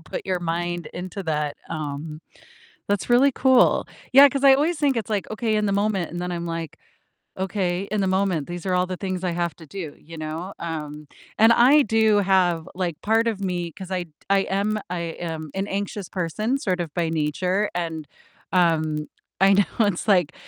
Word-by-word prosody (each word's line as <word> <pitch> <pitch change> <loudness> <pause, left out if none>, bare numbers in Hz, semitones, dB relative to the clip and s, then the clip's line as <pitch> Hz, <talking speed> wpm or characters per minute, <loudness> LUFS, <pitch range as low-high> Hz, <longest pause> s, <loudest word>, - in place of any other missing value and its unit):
put 165 - -6
your 185 -2 -1
mind 175 0 -2
into 185 +2 -5
that, 150 -2 -1
um, 155 0 -5 0.7
that's 205 +3 -1
really 265 +3 +5
cool 260 0 +4 0.2
yeah, 275 +2 +9
'cause 275 0 -3
I 270 -1 +8
always 310 +5 +1
think 280 -4 +1
it's, 220 -2 -3
like, 210 0 -2
okay 220 0 -1
in 210 0 +1
the 200 - 0
moment, 200 -3 0
and 175 - -5
then 180 0 -3
I'm, 170 0 -4
like, 165 -2 -5 0.6
"Okay, 190 -1 -1
in 215 - 0
the 190 - +1
moment, 185 -5 0
these 175 -1 -6
are 185 - +1
all 180 0 +2
the 185 0 -4
things 185 -2 -3
I 180 - +1
have 170 -1 -2
to 160 - -13
do," 160 -2 -7
you 165 +1 -12
know? 160 +5 -5
Um, 150 -2 -5 0.3
and 225 +2 +7
I 255 +6 +6
do 220 -2 +3
have, 180 -4 +2
like 175 -4 -2
part 225 +2 +2
of 215 -4 -1
me 175 -3 -2
'cause 190 +4 -10
I 185 -1 -1
t 165 - -22 0.2
I 195 0 +4
am 200 +3 0
I 180 - -2 0.3
am 155 -1 -6
an 195 +1 -2
anxious 200 -1 -4
person 215 - -1
sort 185 -8 -1
of 165 -4 -4
by 170 -2 0
nature, 180 +6 0
and, 165 -3 -3 0.5
um 155 -4 +1 0.3
I 195 0 +6
know 205 +2 +2
it's, 200 0 -2
like, 180 -7 +3
185 Hz, 200 wpm, -23 LUFS, 165-205 Hz, 0.7 s, yeah